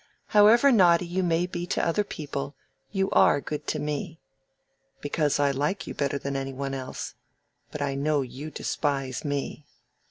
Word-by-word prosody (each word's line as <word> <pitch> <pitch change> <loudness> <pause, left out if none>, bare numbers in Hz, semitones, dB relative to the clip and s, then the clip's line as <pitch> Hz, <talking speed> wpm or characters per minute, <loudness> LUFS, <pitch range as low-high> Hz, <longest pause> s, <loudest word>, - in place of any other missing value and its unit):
"However 225 +6 +6
naughty 180 -6 +5
you 175 +2 -1
may 170 -1 +2
be 175 -1 -5
to - - 0
other 185 +5 +2
people, 145 -6 -5 0.4
you 195 -1 0
are - - +5
good 150 +1 -5
to - - 0
me." 150 +2 -4 0.8
"Because 145 0 0
I 140 -1 +3
like 145 +8 -1
you - - -6
better 140 -1 -1
than 140 0 -4
any 135 0 -3
one 135 +1 -4
else. 130 -1 -5 0.6
But 150 - -4
I 140 -1 -1
know 145 +1 +1
you 135 +4 -7
despise 135 -4 -2
me." 145 0 -3
150 Hz, 165 wpm, -27 LUFS, 140-175 Hz, 0.8 s, However